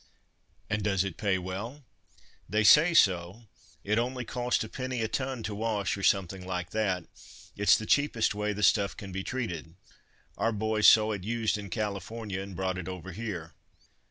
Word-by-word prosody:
"And 105 Hz, 0 st, -1 dB
does 100 Hz, -3 st, +1 dB
it 95 Hz, -4 st, -4 dB
pay 100 Hz, -3 st, +1 dB
well?" 100 Hz, +10 st, -6 dB, 0.7 s
"They 110 Hz, +1 st, +2 dB
say 165 Hz, +9 st, +7 dB
so. 95 Hz, -, +3 dB, 0.4 s
It 105 Hz, +3 st, +1 dB
only 125 Hz, +1 st, -2 dB
costs 125 Hz, 0 st, -1 dB
a -, -, -6 dB
penny 130 Hz, -1 st, -3 dB
a -, -, 0 dB
ton 130 Hz, +1 st, -3 dB
to 110 Hz, -, -3 dB
wash, 105 Hz, -2 st, -1 dB
or 100 Hz, -, -7 dB
something 95 Hz, -1 st, +1 dB
like 90 Hz, -1 st, -4 dB
that. 95 Hz, -5 st, 0 dB, 0.5 s
It's 100 Hz, -1 st, +5 dB
the 110 Hz, -, -5 dB
cheapest 145 Hz, -4 st, +2 dB
way 105 Hz, +1 st, -1 dB
the 105 Hz, 0 st, -3 dB
stuff 100 Hz, -1 st, +3 dB
can 100 Hz, -3 st, -8 dB
be 95 Hz, +1 st, -4 dB
treated. 85 Hz, -11 st, -4 dB, 0.6 s
Our 115 Hz, -, +1 dB
boys 110 Hz, 0 st, +2 dB
saw 110 Hz, 0 st, +7 dB
it 100 Hz, -4 st, -4 dB
used 110 Hz, +1 st, 0 dB
in 100 Hz, -1 st, -6 dB
California, 105 Hz, +1 st, -4 dB
and 95 Hz, -1 st, -8 dB
brought 95 Hz, 0 st, -2 dB
it 90 Hz, -, -6 dB
over 95 Hz, 0 st, -7 dB
here." 90 Hz, -6 st, -6 dB
105 Hz, 180 wpm, -29 LUFS, 95-115 Hz, 0.7 s, say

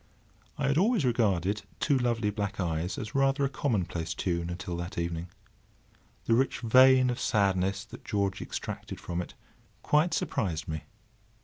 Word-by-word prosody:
I 145 Hz, -, -1 dB
had 140 Hz, +3 st, +3 dB
always 210 Hz, -, +3 dB
regarded 105 Hz, -5 st, +1 dB, 0.2 s
"Two 145 Hz, -, +2 dB
Lovely 120 Hz, -4 st, +1 dB
Black 100 Hz, -1 st, -3 dB
Eyes" 85 Hz, 0 st, -1 dB
as 105 Hz, -, -5 dB
rather 135 Hz, +1 st, +2 dB
a -, -, 0 dB
commonplace 95 Hz, -, -2 dB
tune 85 Hz, -2 st, -1 dB
until 90 Hz, 0 st, -4 dB
that 85 Hz, +1 st, -6 dB
evening. 85 Hz, 0 st, -2 dB, 1.0 s
The 115 Hz, -, +2 dB
rich 130 Hz, +4 st, +1 dB
vein 130 Hz, +2 st, +6 dB
of 120 Hz, -, -4 dB
sadness 95 Hz, -1 st, +1 dB
that 105 Hz, -, -12 dB
George 100 Hz, -2 st, -1 dB
extracted -, -, -6 dB
from 85 Hz, 0 st, -3 dB
it 85 Hz, -, -9 dB, 0.5 s
quite 155 Hz, +3 st, +3 dB
surprised 90 Hz, -, -2 dB
me. 80 Hz, 0 st, -4 dB
105 Hz, 150 wpm, -29 LUFS, 90-130 Hz, 1.0 s, vein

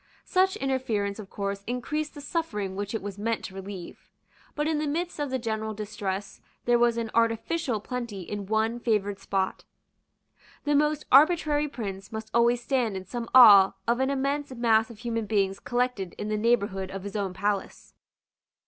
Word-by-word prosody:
Such 375 Hz, +1 st, +2 dB
interference 235 Hz, -, -1 dB
of 200 Hz, -3 st, -9 dB
course 200 Hz, 0 st, -4 dB
increased 300 Hz, +5 st, -3 dB
the 290 Hz, -, -8 dB
suffering 220 Hz, -, -3 dB
which 205 Hz, +2 st, -3 dB
it 220 Hz, -, -3 dB
was 200 Hz, -1 st, -6 dB
meant 225 Hz, +1 st, -1 dB
to 190 Hz, -, -8 dB
relieve. 190 Hz, -2 st, -9 dB, 0.5 s
But 295 Hz, +1 st, 0 dB
in 315 Hz, -1 st, +1 dB
the 305 Hz, -, -1 dB
midst 335 Hz, +3 st, -2 dB
of 290 Hz, -1 st, -1 dB
the 260 Hz, -, 0 dB
general 220 Hz, -2 st, -3 dB
distress 205 Hz, -2 st, -5 dB, 0.2 s
there 240 Hz, 0 st, +4 dB
was 235 Hz, -1 st, +3 dB
an 230 Hz, -2 st, -3 dB
artificial 230 Hz, +3 st, +1 dB
plenty 235 Hz, -3 st, -5 dB
in 200 Hz, +2 st, -6 dB
one 220 Hz, +2 st, 0 dB
favoured 205 Hz, -4 st, 0 dB
spot. 190 Hz, -1 st, -2 dB, 1.0 s
The 295 Hz, -, +1 dB
most 300 Hz, +1 st, +2 dB
arbitrary 300 Hz, 0 st, +5 dB
prince 195 Hz, -7 st, -6 dB
must 220 Hz, 0 st, -6 dB
always 235 Hz, +1 st, +3 dB
stand 240 Hz, -7 st, 0 dB
in 190 Hz, -, -7 dB
some 235 Hz, +4 st, -5 dB
awe 200 Hz, -7 st, +9 dB
of 235 Hz, +1 st, +2 dB
an 265 Hz, +1 st, +1 dB
immense 280 Hz, +1 st, -1 dB
mass 225 Hz, -2 st, +3 dB
of 230 Hz, -, -11 dB
human 230 Hz, -1 st, -3 dB
beings 195 Hz, -2 st, +1 dB
collected 245 Hz, -7 st, -1 dB
in 210 Hz, -, -4 dB
the 215 Hz, -, 0 dB
neighbourhood 200 Hz, -4 st, +1 dB
of 195 Hz, -1 st, -6 dB
his 200 Hz, 0 st, -7 dB
own 195 Hz, -3 st, -2 dB
palace. 200 Hz, 0 st, -3 dB
225 Hz, 175 wpm, -27 LUFS, 200-260 Hz, 1.0 s, awe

